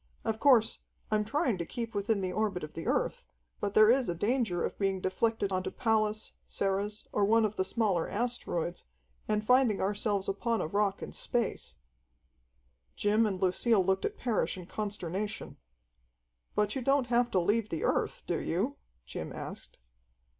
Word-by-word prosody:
Of 220 0 -1
course, 245 -5 +4 0.3
I'm 215 0 +3
trying 235 -3 0
to - - 0
keep 230 -1 -4
within 205 0 0
the 185 -1 -1
orbit 200 -3 -1
of 155 - -7
the 165 - -6
Earth, - - 0 0.4
but 200 - -2
there 215 +1 +8
is 255 -3 +2
a 175 - -1
danger 210 -2 0
of - - -6
being 195 -1 +1
deflected 200 +2 0
onto 185 0 -1
Pallas, 215 -1 0 0.2
Ceres, 200 +2 -2
or 205 - +1
one 220 +2 +4
of 215 0 -2
the 190 - +1
smaller 190 -4 0
asteroids, 205 -7 -2 0.4
and 210 0 0
finding 250 -3 +4
ourselves 200 0 0
upon 225 +3 0
a - - -1
rock 200 +3 0
in - - -6
space." 235 - -2 1.2
Jim 215 +2 +3
and 190 -3 -2
Lucille 190 +2 +3
looked 190 0 +1
at - - -3
Parrish 235 -5 0
in 180 - -8
consternation. 205 0 -4 1.0
"But 210 0 +1
you 265 - -1
don't 275 +1 +3
have 240 0 +2
to 190 - +2
leave 210 +5 +1
the 165 - -3
Earth, - - 0
do - - -1
you?" - - -1 0.3
Jim - - -6
asked. - - -8
210 Hz, 170 wpm, -31 LUFS, 190-230 Hz, 1.2 s, there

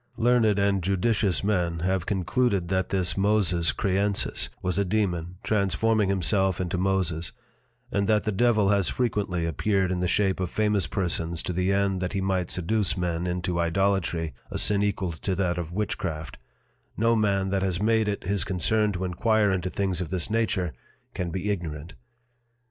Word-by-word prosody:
Learned 115 -3 +3
and 100 -1 +2
judicious 100 0 +1
Men 90 -5 0
have 95 0 0
concluded 100 -1 0
that 95 -1 0
this 90 -3 +1
Moses 95 -4 +2
Creensis 100 0 0
was 90 +1 -1
a - - +3
Dæmon, 90 -4 -1
transforming 105 +1 +1
himself 95 0 +1
into 90 0 -2
Moses: 90 -4 0 0.6
And 100 -3 0
that 105 -1 +3
the 110 - -1
Devil 110 -1 +3
has 100 -2 +2
frequently 100 -8 -1
appeared 95 +4 0
in 90 - -1
the 90 - 0
shape 95 +1 +1
of 90 -2 -1
famous 105 -4 +1
Persons 85 -1 -2
to 90 - -3
the 90 +2 +1
end 100 -1 +1
that 90 +1 -2
he 100 - 0
might 95 -2 0
seduce 100 +3 0
Men 90 -1 -1
into 90 0 -2
Idolatry, 85 -2 0 0.2
(a - - -4
Sin 100 -1 +2
equal 100 -3 -1
to 95 +4 -3
that 90 -2 0
of 85 -1 -5
Witchcraft) 90 -5 -3 0.6
no 115 +2 +3
Man 100 -3 +1
that 100 -1 +1
has 95 -2 0
made 110 +1 +2
it 100 -1 -2
his 100 +2 +1
Concern 105 +4 +1
to 90 +1 -3
enquire 105 +3 +2
into 95 -1 -1
things 95 -2 -2
of 85 - -4
this 95 +2 -3
nature 110 -7 0 0.4
can 90 -1 -3
be 95 +4 -2
ignorant. 85 -3 -5
95 Hz, 170 wpm, -26 LUFS, 90-105 Hz, 0.6 s, Learned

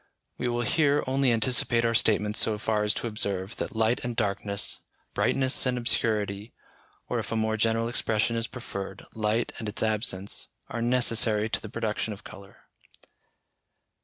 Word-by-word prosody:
We 125 - 0
will 120 0 0
here 145 +1 +2
only 135 0 +2
anticipate 115 0 +2
our 115 - +2
statements 105 -1 +2
so 110 -1 +2
far 105 0 0
as 105 0 +1
to - - -3
observe, 100 -3 -2
that - - -4
light 110 +2 +2
and 120 -1 -3
darkness, 100 -2 0 0.3
brightness 135 0 +2
and 125 -1 +1
obscurity, 105 -3 0 0.5
or - - -1
if - - -5
a - - 0
more 110 0 +1
general 115 +1 +1
expression 115 -1 0
is 115 0 -1
preferred, 100 -6 -7
light 110 +2 0
and 110 - -3
its 105 - -1
absence, 105 -3 -2 0.2
are 115 - -3
necessary 115 -3 +2
to - - 0
the 110 - -8
production 110 -1 -2
of 100 - -12
colour. 100 0 -13
110 Hz, 160 wpm, -27 LUFS, 105-120 Hz, 0.5 s, here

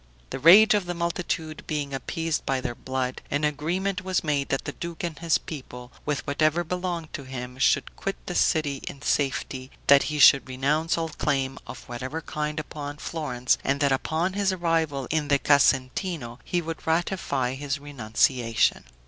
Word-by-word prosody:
The - - -4
rage 195 +10 +8
of 205 -4 0
the 175 - -3
multitude 170 -2 -2
being 145 -3 -2
appeased 165 +4 -2
by 135 -1 0
their 125 -1 -3
blood, 130 +1 -3
an 145 +1 -1
agreement 180 +6 -1
was 185 -1 0
made 145 -3 0
that 135 - -1
the - - -3
duke 170 +2 -7
and 165 -4 -4
his 165 -2 +2
people, 125 -5 -9 0.2
with 150 -2 -1
whatever 155 +4 +2
belonged 175 -1 -4
to - - -4
him, 125 -1 -7
should - - +2
quit 195 - -3
the 180 - -4
city 150 -5 +2
in 140 +1 -7
safety; 135 -2 -1 0.2
that 140 0 +7
he 150 - -2
should 140 -2 +7
renounce 150 +6 0
all 165 -1 -1
claim, 135 -3 -1
of - - -9
whatever 130 +6 -4
kind, 150 0 -3
upon 145 -1 -6
Florence, 130 -6 -1
and 140 +1 +1
that 140 -1 +3
upon 160 +7 0
his 200 -1 +1
arrival 165 -6 0
in 155 -1 0
the 140 0 +4
Casentino 135 0 +1
he 175 - -1
should 165 -1 -7
ratify 160 -6 0
his 140 +1 -3
renunciation. 120 - +1
150 Hz, 175 wpm, -26 LUFS, 135-165 Hz, 0.2 s, rage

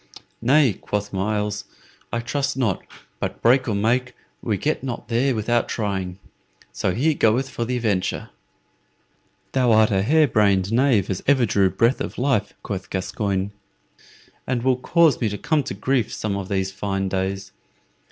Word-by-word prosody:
"Nay," 135 0 +4
quoth 105 +2 -4
Myles, 105 +1 -1 0.5
"I 115 - -1
trust 140 +3 -2
not; 115 -8 0 0.4
but - - -3
break 130 +3 +4
or 110 - 0
make, 125 +5 0 0.3
we 105 -4 -1
get 155 +10 -1
not 120 -3 -5
there 125 +3 +2
without 120 +2 0
trying. 95 -4 -2 0.5
So 75 +9 -1
here 155 +6 +2
goeth 125 +1 +2
for 120 -2 -4
the 125 +1 -1
venture." 105 -6 -1 1.2
"Thou 125 -3 +2
art 110 -1 +5
a 95 -1 +2
hare 150 +8 +4
brained 100 -3 +2
knave 115 -6 +3
as 95 - -3
ever 135 -3 +4
drew 100 -2 +3
breath 115 +7 +1
of - - -5
life," 120 -6 0
quoth 95 -2 -5
Gascoyne, 95 +1 -2 1.0
"and 125 -2 -1
will 130 -1 +3
cause 160 +3 +3
me 115 - +2
to 105 - -4
come 150 +3 +1
to 110 - -5
grief 120 +2 0
some 105 -2 -3
of 100 -1 -5
these 95 -1 -1
fine 95 -1 -2
days. 95 +1 -3
110 Hz, 160 wpm, -23 LUFS, 100-130 Hz, 1.2 s, art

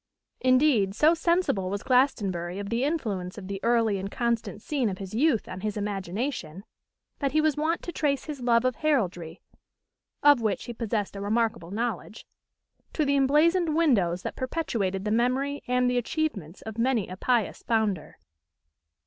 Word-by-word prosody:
Indeed, 255 -7 +3
so 305 +8 +5
sensible 335 - +1
was 200 +1 -3
Glastonbury 195 -9 +1
of 200 +1 -5
the 235 +2 0
influence 215 - -2
of 190 -3 -8
the 195 0 -4
early 230 -4 +2
and 195 +1 -4
constant 235 -2 -2
scene 260 -1 -1
of 190 - -5
his 190 0 -8
youth 245 -1 +2
on 185 0 -7
his 210 0 -3
imagination, 200 - -3 0.6
that 275 -2 -1
he 310 - +4
was 310 -2 +2
wont 315 +3 -1
to 345 - -5
trace 290 -4 0
his 295 -4 -7
love 240 0 +3
of 255 - 0
heraldry, 185 - -1 0.8
of 290 -4 +6
which 210 -5 -1
he 240 - -6
possessed 220 -3 -2
a 200 - -5
remarkable 215 -4 0
knowledge, 220 0 -4 0.7
to 305 - +1
the 280 0 +2
emblazoned 305 +5 +3
windows 195 - +2
that - - -4
perpetuated 225 - -2
the 210 - 0
memory 260 +5 +1
and 250 0 +2
the 250 0 +2
achievements 230 - -3
of 220 0 -7
many 235 -4 +1
a 185 - -7
pious 235 +2 0
founder. 215 -8 -1
230 Hz, 165 wpm, -27 LUFS, 200-280 Hz, 0.8 s, of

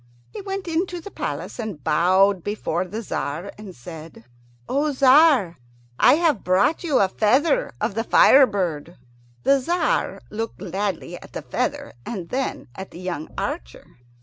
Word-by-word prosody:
He 425 - -7
went 390 -1 -5
into 350 +2 -2
the 400 +4 -10
palace, - - -5
and 205 - -6
bowed 185 +5 +3
before 185 -4 -2
the 210 +5 -6
Tzar 170 0 -4
and 210 -3 -11
said, 155 -1 -11 0.4
"O 290 +2 0
Tzar, 265 - +5 0.4
I 260 - +6
have 315 - +1
brought 195 - +2
you 300 -6 +1
a 195 - +4
feather 255 - +2
of - - -1
the 225 +2 -1
fire 270 +3 +6
bird." 170 -5 -3 0.5
The 275 0 +4
Tzar 345 +7 0
looked 225 +2 -4
gladly 195 -2 -4
at - - -14
the - - -6
feather, - - -3
and 185 - -6
then 265 +1 -3
at 190 +4 -8
the 170 - -12
young 180 -4 -5
archer. - - -5
210 Hz, 155 wpm, -23 LUFS, 180-280 Hz, 0.5 s, I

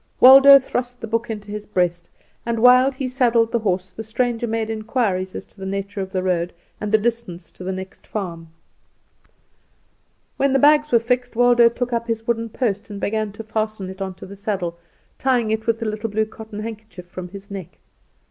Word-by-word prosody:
Waldo 275 +2 +10
thrust 245 -2 -3
the - - -5
book 230 +1 -2
into 210 -2 -6
his 210 0 -6
breast, 175 -3 -1 0.3
and 235 0 -2
while 250 +3 +6
he 265 0 -4
saddled 240 -3 +2
the 235 - +1
horse 190 -4 0
the 200 - -8
stranger 235 +1 -1
made 225 -1 -1
inquiries 215 -4 -1
as - - -6
to - - -24
the 190 - -6
nature 195 +1 -4
of 190 0 -5
the 185 -2 -1
road 175 -2 0 0.3
and 210 -1 -3
the 220 - +6
distance 215 -7 -3
to - - -11
the 190 - -2
next 190 0 -8
farm. 170 -6 -5 1.9
When 275 0 +2
the - - +5
bags 295 +2 +4
were 235 - +6
fixed, 245 +1 -1
Waldo 240 0 +5
took 245 +1 -4
up 235 0 -1
his 225 -1 -2
wooden 230 -1 -1
post 210 -3 -2
and 205 -1 -7
began 215 0 -1
to 225 - -8
fasten 215 -3 -3
it 190 +1 -11
on 190 -1 -4
to - - -11
the 200 - -10
saddle, 195 -4 -3 0.4
tying 245 -4 +1
it 220 +1 -2
with 230 -1 +1
the 230 - -3
little 215 +1 -3
blue 215 +1 0
cotton 220 -1 -9
handkerchief 215 -5 -8
from 180 0 -8
his 200 +2 -11
neck. 185 -3 -8
220 Hz, 205 wpm, -21 LUFS, 195-235 Hz, 1.9 s, Waldo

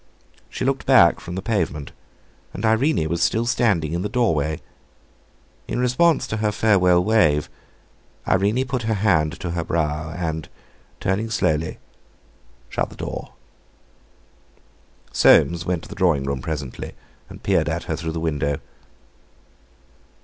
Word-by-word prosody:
She - - -4
looked 135 0 -1
back 125 -11 +6
from 90 - -7
the 95 - -4
pavement, 80 - -2 0.6
and 100 - -3
Irene 110 - +2
was 85 +1 -2
still 115 +6 +2
standing 100 -10 +1
in 85 - -1
the 105 - -2
doorway. 80 - 0 1.1
In - - -3
response 125 +6 +3
to 110 - -3
her 105 -1 0
farewell 90 -5 +3
wave, 85 -9 +2 0.8
Irene 105 +7 +2
put 130 -1 -2
her 110 -1 0
hand 90 -7 +1
to 90 -3 -3
her 85 -1 -2
brow, 75 -2 -1
and, 80 -2 -4 0.5
turning 100 +4 -1
slowly, 80 -7 0 0.9
shut - - -2
the - - -13
door.... - - -6 1.8
Soames 85 0 +4
went 90 -2 -1
to - - -12
the - - -7
drawing 85 -8 +2
room 70 -1 -3
presently, 70 -3 -5 0.4
and - - -12
peered - - +2
at - - -2
her - - -3
through 80 -1 -4
the 80 - -3
window. 75 -3 -1
90 Hz, 140 wpm, -22 LUFS, 80-110 Hz, 1.8 s, back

